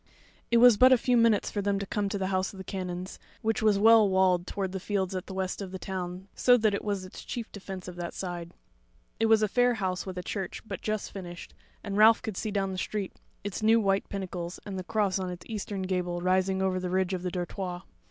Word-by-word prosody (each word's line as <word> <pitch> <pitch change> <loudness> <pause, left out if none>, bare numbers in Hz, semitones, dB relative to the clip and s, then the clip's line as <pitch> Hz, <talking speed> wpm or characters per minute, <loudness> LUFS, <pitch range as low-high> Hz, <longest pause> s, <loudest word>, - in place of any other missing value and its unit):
It 235 - +4
was 240 -2 +8
but 255 +3 +7
a 255 - +7
few 250 +1 +1
minutes 230 -3 +3
for 205 - -1
them 200 0 +1
to 200 - -3
come 200 +1 -1
to 200 - -2
the 190 - -1
House 185 +1 0
of - - -11
the 190 - -7
Canons, 185 -1 -5 0.2
which 225 0 0
was 215 -2 +4
well 220 0 +6
walled 185 -2 +3
toward 195 -2 -3
the 190 - -4
fields 190 -1 -1
at 185 0 -4
the 190 - -7
west 190 +1 -2
of 195 - -5
the 190 - -5
town, 185 0 -5
so 245 -1 +5
that 215 -3 +2
it 200 - -2
was 200 -3 -2
its 185 - -10
chief 235 -2 -5
defence 190 -2 -8
of 180 -1 -8
that 175 -1 -5
side. 175 -2 -5 0.6
It 225 - +3
was 220 -1 +5
a - - +3
fair 245 +3 +3
house 190 -3 -2
with 185 -1 -6
a 180 - -4
church 190 -1 -4
but - - -6
just 215 -1 -2
finished, 175 -3 -8 0.3
and 200 -2 -3
Ralph 220 +3 +6
could 220 -5 -4
see 215 - -3
down 195 -2 -1
the 185 - -4
street 205 -1 -3 0.3
its 205 -1 -4
new 225 +1 +5
white 195 -2 +1
pinnacles 180 -3 -5
and 195 -2 -5
the - - -5
cross 205 -1 0
on 185 -1 -3
its 180 0 -8
eastern 205 -3 -4
gable 180 -2 -1
rising 190 +1 +1
over 185 -1 +1
the 180 0 -3
ridge 185 +1 0
of 180 - -2
the 180 - -2
dortoir. 180 0 -4
190 Hz, 250 wpm, -28 LUFS, 185-210 Hz, 0.6 s, was